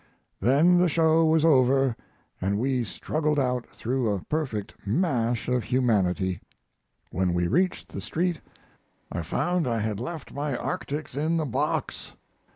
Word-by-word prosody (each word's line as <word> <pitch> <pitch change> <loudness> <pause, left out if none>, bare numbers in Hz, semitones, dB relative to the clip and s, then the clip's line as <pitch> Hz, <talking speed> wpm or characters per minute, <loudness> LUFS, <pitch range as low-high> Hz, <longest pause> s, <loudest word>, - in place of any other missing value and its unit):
then 160 +8 +4
the 180 -1 +4
show 160 +1 +4
was 160 0 +3
over 135 -4 +4 0.5
and 100 +2 0
we 130 +1 0
struggled 150 - -1
out 125 -3 0
through 125 0 -1
a 100 - 0
perfect 135 -10 -3
mash 120 - 0
of 125 -4 0
humanity. 95 -7 +1 0.7
When 90 -1 0
we 90 0 +1
reached 180 - 0
the - - -6
street 175 0 -1 0.7
I - - -2
found 175 - 0
I 115 -2 0
had 105 -1 -2
left 155 +6 -6
my 140 -2 -2
arctics 145 -2 -4
in 160 +4 +1
the 160 - 0
box. 125 - -2
130 Hz, 145 wpm, -26 LUFS, 115-160 Hz, 0.7 s, then